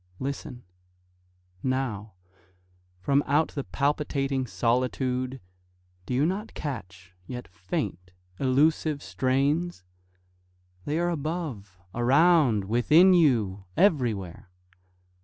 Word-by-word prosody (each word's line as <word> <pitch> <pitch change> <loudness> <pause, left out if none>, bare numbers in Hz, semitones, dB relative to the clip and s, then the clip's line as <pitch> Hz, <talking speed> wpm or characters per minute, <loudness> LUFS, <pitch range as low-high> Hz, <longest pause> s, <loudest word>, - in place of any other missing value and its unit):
Listen! 130 0 -5 1.0
Now, 120 -6 -2 0.8
From 140 +10 +1
out 145 +3 +2
the 140 - -4
palpitating 140 -2 -1
solitude 125 +2 -1 0.7
Do 125 - -1
you 140 +4 +3
not 195 +6 -3
catch, 90 - -7
yet 125 -1 -6
faint, 90 0 -4 0.3
elusive 145 +2 +2
strains? 140 - 0 1.0
They 150 - -1
are 175 +1 +1
above, 145 - -4 0.2
around, 130 - +4
within 150 - +5
you, 110 - +2
everywhere. 115 - +1
130 Hz, 85 wpm, -27 LUFS, 115-150 Hz, 1.0 s, within